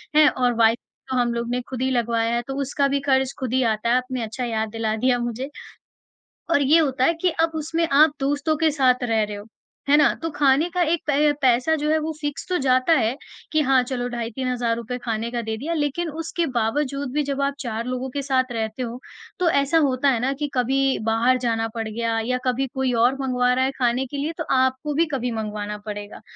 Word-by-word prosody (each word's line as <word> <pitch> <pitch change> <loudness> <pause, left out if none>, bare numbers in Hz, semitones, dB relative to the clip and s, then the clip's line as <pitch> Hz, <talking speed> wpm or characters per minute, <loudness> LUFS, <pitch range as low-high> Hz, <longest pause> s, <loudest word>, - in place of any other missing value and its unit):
हैं? 305 -1 +7
और 245 -1 0
वाई 225 0 +5
तो 260 +1 -10
हम 240 -1 +1
लोगों 235 0 -3
ने 250 0 -1
ख़ुद 255 -1 -5
ही 260 - +1
लगवाया 235 -1 0
है 240 - 0
तो 270 - -4
उसका 280 +1 0
भी 280 0 0
ख़र्च 265 0 +2
ख़ुद 255 -2 -3
ही 260 - +3
आता 220 0 0
है, 240 - +4
आपने 255 -1 -3
अच्छा 225 +3 -5
याद 220 -2 -2
दिला 225 -1 -1
दिया 245 +3 +2
मुझे। 240 +3 -4 1.0
और 290 - +4
ये 295 +4 +5
होता 265 -4 +1
है 335 - +3
कि 365 - +3
अब 330 0 +2
उसमें 325 +2 -1
आप 295 +1 +5
दोस्तों 285 +3 0
के 315 -1 +2
साथ 255 -3 +2
रह 225 -2 +1
रहे 210 0 -4
हो, 205 +1 -9 0.4
है 290 - +6
ना? 295 -2 +4
तो 330 - -1
ख़ाने 290 +3 +3
का 360 +1 -1
एक 330 0 0
पै 295 +1 +3
पैसा 255 +4 +3
जो 300 0 -2
है 315 - +3
वो 310 +1 -3
फिक्स 290 -1 -4
तो 360 - +1
जाता 255 +3 +3
है 240 -4 +2 0.4
कि 310 - +2
हाँ, 265 -2 +4
चलो 245 -1 -3
ढाई 235 -1 -4
3 250 -3 -1
रुपए 235 +2 -4
ख़ाने 230 0 -2
का 240 -1 -2
दे 220 -1 -4
दिया 310 +8 -3
लेक़िन 315 +2 -1
उसके 330 +2 -3
बावजूद 275 +4 -1
भी 300 - +1
जब 280 0 -2
आप 280 0 +1
4 230 -3 -4
लोगों 255 +1 -3
के 280 +2 -3
साथ 260 -2 0
रहते 225 +2 -3
हो, 240 +1 -5 0.4
तो 355 - +3
ऐसा 280 +1 +2
होता 265 +1 +1
है 240 -4 +1
ना 260 +3 0
कि 295 - -2
कभी 270 +2 +1
बाहर 235 +3 +3
जाना 225 -1 0
पड़ 225 -1 -3
गया 225 0 -1
या 250 +1 0
कभी 255 +2 0
कोई 265 -2 0
और 240 +3 +3
मँगवा 250 -1 +1
रहा 260 +1 +2
है 270 - 0
ख़ाने 245 +1 +1
के 285 +3 -7
लिए 300 +4 -2
तो 320 - -2
आपको 260 +3 +1
भी 325 +4 +3
कभी 250 -2 -1
मँगवाना 210 -2 -4
पड़ेगा। 205 -1 -7
255 Hz, 235 wpm, -23 LUFS, 235-285 Hz, 1.0 s, हैं